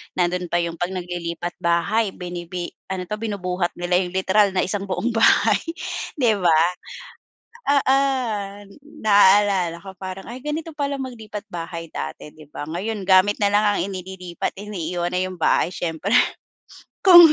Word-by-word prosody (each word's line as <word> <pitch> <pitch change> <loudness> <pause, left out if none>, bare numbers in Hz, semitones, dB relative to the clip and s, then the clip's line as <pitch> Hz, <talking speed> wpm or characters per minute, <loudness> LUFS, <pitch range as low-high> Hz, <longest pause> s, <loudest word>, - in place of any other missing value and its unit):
nando'n 180 0 0
pa 175 +1 +1
'yong 170 0 -3
'pag 175 +2 -2
naglilipat 175 -1 -4
bahay, 190 +5 +1
binibi 175 0 -5 0.2
ano 190 -1 -3
'to, 210 - -2
binubuhat 185 -5 -2
nila 175 0 +1
yung 180 -1 -3
literal 190 +1 +3
na 190 - +2
isang 195 +1 -2
buong 195 +4 -1
bahay, 225 -1 +4 0.6
'di 245 -7 +3
ba? 170 -4 +4 1.2
Oo! 270 -1 +4 1.1
Naalala 200 -4 +5
ko 190 -1 -11
parang, 190 +2 -7
ay 240 - -6
ganito 310 +2 -3
pala 280 -1 -2
maglipat 220 -5 -7
bahay 165 -2 -6
dati, 70 - -6
di 155 0 -15
ba? 145 - -7
Ngayon 200 +5 -3
gamit 190 +3 +5
na 205 - +4
lang 205 +1 +3
ang - - -1
inililipat 185 -2 -4
iniiwan 180 -4 -3
na - - +1
yung 185 -1 -7
bahay 175 - +2
siyempre 175 +4 -2 0.9
kung 345 -4 +9
185 Hz, 150 wpm, -22 LUFS, 175-210 Hz, 1.2 s, kung